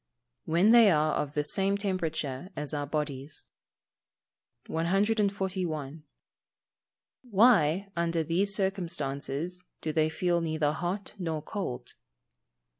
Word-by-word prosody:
_ - - -56 0.4
When 175 +7 +4
they 230 -3 +8
are 155 -3 +3
of 145 -1 -2
the 150 - +1
same 195 +6 +1
temperature 165 -6 -2
as 150 0 -1
our 145 -1 -2
bodies. 145 -1 -4 1.1
141. 185 -5 -1 1.3
_Why, 195 -4 +4
under 170 -1 0
these 190 +5 +1
circumstances, 170 -3 -2 0.2
do 155 - -3
they 155 0 +2
feel 175 +1 0
neither 155 -2 0
hot 175 +5 -3
nor 160 -4 -3
cold? 130 - -5
165 Hz, 110 wpm, -29 LUFS, 150-195 Hz, 1.3 s, they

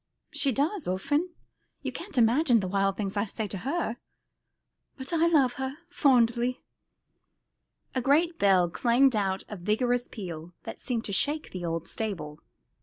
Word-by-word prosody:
"She 275 - +2
does, 300 - -1
often. 290 - 0 0.5
You - - -2
can't 380 -4 -7
imagine 240 +2 +4
the 190 - -2
wild 195 0 +1
things 200 -2 -3
I 205 +1 +1
say 220 +1 -4
to 195 - -5
her. 270 - -2 1.0
But 265 +4 -7
I 335 0 +4
love 280 -7 +4
her 265 +2 -3
fondly." 250 -5 +2 1.3
A 255 - 0
great 320 +6 +2
bell 190 -3 +4
clanged 245 +7 +3
out 195 -2 0
with 210 - -7
a - - -15
vigorous 245 +5 +1
peal, 175 -5 -7
that - - -7
seemed 235 -3 -2
to 200 - -4
shake 295 +10 0
the 180 -2 -5
old 165 0 -3
stable. 165 -9 -4
235 Hz, 160 wpm, -28 LUFS, 195-275 Hz, 1.3 s, imagine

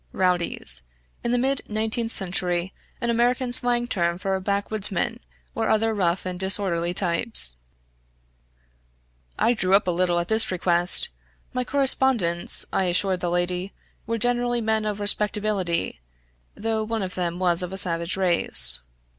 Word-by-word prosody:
{rowdies 175 - 0 0.2
= - - -38
in 235 - -1
the 245 - +2
mid 265 +2 0
nineteenth 220 +2 -2
century, 180 -2 -1 0.3
an 235 -1 0
American 245 +2 0
slang 245 -1 +4
term 170 -6 -1
for 190 0 -2
backwoodsmen 200 +2 -2 0.3
or 225 -1 -2
other 220 +1 +1
rough 185 -3 -1
and 180 -1 -5
disorderly 190 -3 +2
types} 175 - 0 1.8
I 240 - +2
drew 190 -4 +2
up 200 - +3
a - - +2
little 175 0 0
at 170 0 -1
this 220 0 +2
request; 175 -1 +2 0.4
my 250 - -1
correspondents, 255 -10 +2
I 190 - +1
assured 185 +1 +1
the 175 - -2
lady, 180 +2 -2 0.3
were 230 - -1
generally 240 +1 0
men 220 -1 0
of 210 -1 -3
respectability, 205 - 0 0.6
though 220 0 -2
one 220 -1 -3
of 185 -1 -5
them 175 -1 -3
was 180 -2 +1
of 180 0 -4
a 190 - -4
savage 170 -1 0
race. 65 - +5
195 Hz, 145 wpm, -24 LUFS, 175-225 Hz, 1.8 s, race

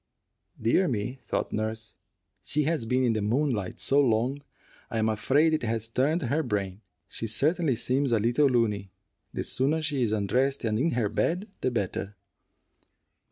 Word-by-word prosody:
"Dear 120 +12 +2
me," 125 +2 -3
thought - - -3
nurse, 110 0 -3 0.5
"she 150 - -1
has 155 -5 0
been 125 +3 +1
in 120 -2 +2
the 110 - -1
moonlight 115 -2 0
so 140 +1 +2
long 125 +2 +1 0.5
I - - -3
am 110 0 +2
afraid 140 +9 +2
it 155 - +1
has 115 -1 -1
turned 145 +8 +1
her 140 +6 +1
brain. 100 -6 -3 0.3
She 115 - -5
certainly 150 - +2
seems 130 +3 +1
a 115 - +4
little 120 +7 +3
looney. 110 -6 0 0.4
The - - -3
sooner 140 +5 0
she 150 -4 -1
is 115 -3 +1
undressed 125 +7 0
and 110 0 0
in 160 +6 +1
her 120 -3 +1
bed, 175 - -1
the - - +1
better." 100 -3 -3
120 Hz, 165 wpm, -27 LUFS, 110-140 Hz, 0.5 s, a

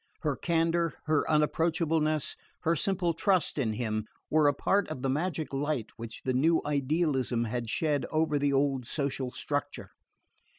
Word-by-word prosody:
Her 150 -4 0
candour, 165 0 +1
her 155 -2 +2
unapproachableness, 155 0 +1 0.3
her 165 +1 +2
simple 180 0 +1
trust 185 -2 +1
in 115 -5 0
him, 110 -1 -2 0.2
were 155 -1 +5
a 145 - +4
part 200 +1 +1
of 140 -4 -6
the 135 - +1
magic 160 +1 -2
light 140 -4 -1
which 115 -1 -8
the 130 - +1
new 160 +6 +3
idealism 140 -4 +1
had 120 0 -3
shed 145 -1 0
over 155 -2 +1
the 140 0 +2
old 135 -3 +1
social 140 -3 -2
structure. 145 +3 -4
150 Hz, 155 wpm, -29 LUFS, 130-160 Hz, 0.3 s, were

